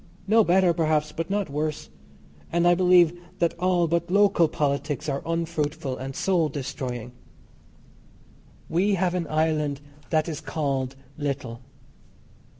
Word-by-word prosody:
No 220 Hz, +2 st, +5 dB
better, 180 Hz, -1 st, +4 dB
perhaps, 155 Hz, -2 st, +1 dB
but 165 Hz, +3 st, -4 dB
not 200 Hz, -1 st, 0 dB
worse. 150 Hz, +1 st, -3 dB, 0.6 s
And 170 Hz, +1 st, +2 dB
I 175 Hz, -, +6 dB
believe 175 Hz, -1 st, +4 dB, 0.2 s
that 170 Hz, -2 st, +1 dB
all 180 Hz, -2 st, +2 dB
but 170 Hz, +1 st, -1 dB
local 200 Hz, -3 st, +4 dB
politics 145 Hz, 0 st, -2 dB
are 140 Hz, -1 st, -1 dB
unfruitful 160 Hz, -4 st, -2 dB
and 135 Hz, +1 st, -6 dB
soul 175 Hz, -5 st, +1 dB
destroying. 125 Hz, -4 st, -5 dB, 1.6 s
We 190 Hz, +5 st, +2 dB
have 180 Hz, -1 st, 0 dB
an 175 Hz, -3 st, -2 dB
island 155 Hz, -2 st, 0 dB, 0.3 s
that 155 Hz, -1 st, +1 dB
is 155 Hz, -4 st, -4 dB
called 135 Hz, -4 st, -2 dB, 0.2 s
little. 135 Hz, -5 st, -3 dB
160 Hz, 130 wpm, -25 LUFS, 145-175 Hz, 1.6 s, I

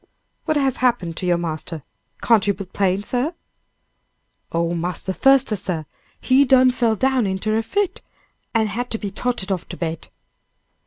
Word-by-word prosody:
"What 310 Hz, -2 st, +1 dB
has 270 Hz, -3 st, +1 dB
happened 235 Hz, -10 st, +1 dB
to 180 Hz, -, -3 dB
your 175 Hz, -1 st, +3 dB
master? 160 Hz, -2 st, -4 dB, 0.4 s
Can't 220 Hz, -3 st, +4 dB
you 200 Hz, -, +2 dB
be 195 Hz, +1 st, -6 dB
plain, 190 Hz, +1 st, 0 dB
sir?" 255 Hz, +10 st, -1 dB, 1.2 s
"Oh, 170 Hz, 0 st, 0 dB
Marse 175 Hz, +1 st, -2 dB
Thuster, 265 Hz, +4 st, +3 dB
sir! 180 Hz, -5 st, -3 dB, 0.3 s
he 265 Hz, +2 st, +4 dB
done 255 Hz, -1 st, +5 dB
fell 235 Hz, -3 st, +1 dB
down 260 Hz, -1 st, +1 dB
inter 195 Hz, +3 st, -1 dB
a 225 Hz, -, +2 dB
fit, 395 Hz, -, -1 dB, 0.5 s
an 225 Hz, -1 st, +3 dB
had 235 Hz, +4 st, -3 dB
to 225 Hz, -, -1 dB
be 205 Hz, -2 st, -5 dB
toted 220 Hz, -3 st, -2 dB
off 185 Hz, -3 st, -3 dB
to -, -, -7 dB
bed." 165 Hz, -1 st, -4 dB
210 Hz, 165 wpm, -21 LUFS, 180-250 Hz, 1.2 s, done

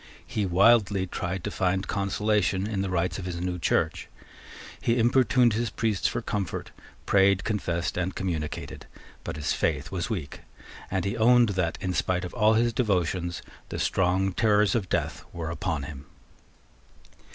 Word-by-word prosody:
He 105 Hz, -2 st, -2 dB
wildly 100 Hz, +1 st, +4 dB
tried 90 Hz, 0 st, -4 dB
to -, -, -3 dB
find 95 Hz, +1 st, 0 dB
consolation 100 Hz, -1 st, 0 dB
in 105 Hz, -2 st, -2 dB
the 100 Hz, -, -2 dB
rites 90 Hz, +1 st, -1 dB
of 90 Hz, -, -6 dB
his 90 Hz, -2 st, -4 dB
new 90 Hz, 0 st, -3 dB
Church. -, -, 0 dB, 0.7 s
He 115 Hz, +1 st, +1 dB
importuned 120 Hz, 0 st, +4 dB
his 115 Hz, +1 st, -1 dB
priests 110 Hz, -4 st, 0 dB
for 120 Hz, -, -3 dB
comfort, 100 Hz, -7 st, -3 dB, 0.3 s
prayed, 95 Hz, -1 st, +4 dB
confessed, 90 Hz, -7 st, -2 dB
and 90 Hz, +1 st, -2 dB
communicated: 85 Hz, -5 st, -4 dB, 0.4 s
but -, -, -5 dB
his 75 Hz, 0 st, -1 dB
faith 75 Hz, 0 st, -1 dB
was 95 Hz, +3 st, -3 dB
weak; 85 Hz, -11 st, -4 dB, 0.5 s
and 95 Hz, -2 st, -1 dB
he 100 Hz, -, -1 dB
owned 120 Hz, 0 st, +5 dB
that, 90 Hz, -4 st, -1 dB
in 95 Hz, -1 st, -1 dB
spite 90 Hz, +1 st, 0 dB
of 90 Hz, -, -8 dB
all 110 Hz, +1 st, +4 dB
his 120 Hz, +1 st, +2 dB
devotions, 90 Hz, -6 st, -1 dB, 0.3 s
the -, -, -4 dB
strong 95 Hz, +1 st, +1 dB
terrors 105 Hz, +1 st, +3 dB
of 105 Hz, -7 st, -1 dB
death -, -, -2 dB
were 80 Hz, -1 st, -4 dB
upon 80 Hz, -2 st, -2 dB
him. 70 Hz, -1 st, -9 dB
95 Hz, 160 wpm, -27 LUFS, 90-105 Hz, 0.7 s, owned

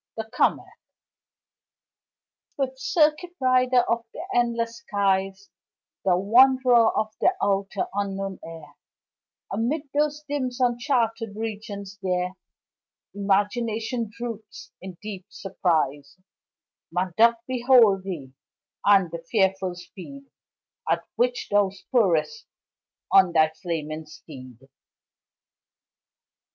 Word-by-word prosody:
The 220 Hz, 0 st, -4 dB
Comet -, -, +2 dB, 1.9 s
Swift 265 Hz, -1 st, -3 dB
circuit 310 Hz, +5 st, +1 dB
rider 255 Hz, -1 st, +3 dB
of 230 Hz, 0 st, 0 dB
the 325 Hz, -, -7 dB
endless 235 Hz, -1 st, 0 dB
skies, 195 Hz, -3 st, -1 dB, 0.5 s
Thou 180 Hz, -2 st, +3 dB
wanderer 245 Hz, +3 st, +5 dB
of 215 Hz, 0 st, -1 dB
the 370 Hz, -, +3 dB
outer, 195 Hz, 0 st, 0 dB
unknown 195 Hz, -1 st, -3 dB
air, 160 Hz, -3 st, -10 dB, 0.8 s
Amid 245 Hz, +9 st, -1 dB
those 300 Hz, +1 st, 0 dB
dim, 280 Hz, -3 st, -1 dB
uncharted 240 Hz, -3 st, 0 dB
regions 205 Hz, -2 st, -6 dB
there, 180 Hz, -1 st, -1 dB, 0.8 s
Imagination 220 Hz, +3 st, -1 dB
droops 230 Hz, -2 st, -8 dB
in 185 Hz, -1 st, -9 dB
deep 200 Hz, -3 st, -7 dB
surprise 160 Hz, -7 st, -2 dB, 0.7 s
Man 180 Hz, +1 st, -2 dB
doth 230 Hz, +2 st, +5 dB
behold 245 Hz, -6 st, +4 dB
thee, 160 Hz, -9 st, -7 dB, 0.5 s
and 195 Hz, -4 st, +4 dB
the 170 Hz, -, -5 dB
fearful 190 Hz, -3 st, +1 dB
speed 195 Hz, +10 st, -11 dB, 0.7 s
At -, -, +1 dB
which 245 Hz, 0 st, 0 dB
thou 205 Hz, -1 st, +4 dB
spurrest 180 Hz, -, 0 dB, 0.6 s
on 185 Hz, -3 st, +5 dB
thy 155 Hz, -1 st, +4 dB
flaming 160 Hz, -2 st, -5 dB
steed. 135 Hz, -5 st, -13 dB
205 Hz, 95 wpm, -25 LUFS, 185-240 Hz, 1.9 s, wanderer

